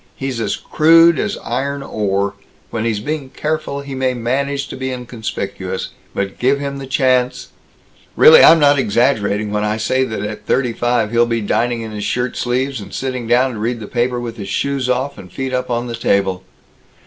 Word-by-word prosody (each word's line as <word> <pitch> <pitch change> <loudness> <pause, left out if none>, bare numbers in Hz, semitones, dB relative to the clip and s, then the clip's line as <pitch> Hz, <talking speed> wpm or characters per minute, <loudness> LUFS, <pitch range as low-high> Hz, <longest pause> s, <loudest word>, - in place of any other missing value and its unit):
He's 130 -3 -3
as 110 - -1
crude 165 +1 +5
as 215 -1 -1
iron 140 +4 -2
ore. 100 -3 -1 0.4
When 115 -1 -2
he's 110 -3 0
being 145 +3 -4
careful, 155 -1 -3
he 140 -1 -8
may 130 -1 0
manage 140 +4 -1
to - - -6
be 130 0 -3
inconspicuous, 125 -3 -5 0.3
but 100 -1 -3
give 135 +3 +2
him 140 -1 -4
the 135 - -7
chance 130 -1 +1 0.7
"Really, 475 +1 +8
I'm 165 - +9
not 145 -2 +4
exaggerating 105 -3 +1
when 105 0 0
I 105 +1 0
say 130 +4 +1
that 110 -4 -4
at 105 0 -6
thirty 125 -3 +1
five 120 -2 0
he'll 120 0 +3
be 115 -1 -1
dining 120 +3 0
in 110 -1 -6
his 105 -1 -5
shirt 125 +3 -1
sleeves, 130 0 -1
and 100 - -10
sitting 130 -3 -4
down 125 +2 +3
to 110 - -6
read 115 +2 -2
the 110 - -7
paper 120 +2 -1
with 120 -1 -6
his 100 -2 -6
shoes 135 +2 -1
off 130 +3 -1
and 90 -2 -12
feet 130 +3 -4
up 125 0 -1
on 120 0 -1
the 120 -1 -4
table. 95 -5 0
125 Hz, 195 wpm, -18 LUFS, 110-135 Hz, 0.7 s, I'm